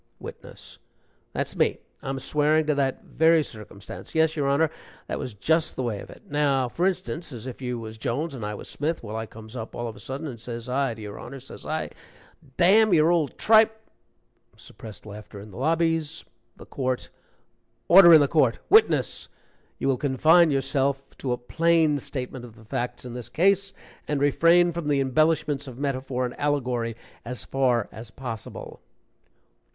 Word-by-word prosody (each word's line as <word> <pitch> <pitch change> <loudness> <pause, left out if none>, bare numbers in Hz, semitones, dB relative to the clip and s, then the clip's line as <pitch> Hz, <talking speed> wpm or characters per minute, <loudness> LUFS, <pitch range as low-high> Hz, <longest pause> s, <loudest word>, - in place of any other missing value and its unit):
WITNESS. - - -11 0.5
"That's - - -3
me - - +2 0.2
I'm 135 0 -3
swearing 150 +3 +2
to 150 - +2
that 135 -2 -1
very 160 0 +3
circumstance 105 -1 -10
yes, 160 0 +3
your 145 -3 0
Honor, 150 +3 +2 0.3
that - - -4
was 120 - -5
just 160 +11 +1
the 130 - -2
way 110 -4 -2
of - - -10
it. - - -14
Now, 140 -3 +1
for 175 +9 0
instance, 180 -4 -3
as 120 -3 -8
if 130 0 -8
you 125 -1 -3
was 110 -1 -8
Jones 145 +8 -2
and 125 -5 -7
I 105 0 -3
was - - -9
Smith. 155 +1 -3
Well, 110 -1 -6
I 110 0 -4
comes 110 +2 -12
up 110 -2 -6
all 120 - -3
of 110 - -7
a - - -13
sudden 135 +4 -6
and 125 -6 -6
says 115 0 -6
I 130 -1 0
to 110 - -11
your 105 -1 -8
Honor, 135 - -8
says 130 - -11
I, - - -2 0.7
'D 175 - +4
n 215 +3 +6
your 160 0 +5
old 160 -6 0
tripe 220 0 +5 0.4
'" - - -38
(Suppressed 110 -2 -12
laughter 105 -1 -10
in 105 +1 -11
the 95 - -11
lobbies.) 165 +2 0 0.3
THE - - -12
COURT. 130 -2 -3 0.8
"Order 175 -1 +9
in 160 -2 +9
the 145 - +3
court! 135 -6 +3
Witness, 435 +2 +3 0.5
you - - -2
will 135 -2 +2
confine 155 +6 +4
yourself 135 0 -1
to 130 - -2
a 125 - 0
plain 160 +3 +2
statement 130 -1 -6
of 115 -3 -12
the 110 - -16
facts 125 +1 -4
in 125 - -7
this 120 -1 -7
case, 195 +7 +2 0.4
and 150 -1 0
refrain 170 +5 +4
from 170 -2 -4
the 145 -2 +2
embellishments 145 +1 +1
of 125 -2 -9
metaphor 130 -2 -2
and 125 - -4
allegory 125 -5 -1 0.3
as 125 +1 -7
far 125 -5 +1
as 110 +1 -10
possible." 115 -2 -8
135 Hz, 185 wpm, -25 LUFS, 120-160 Hz, 0.8 s, Order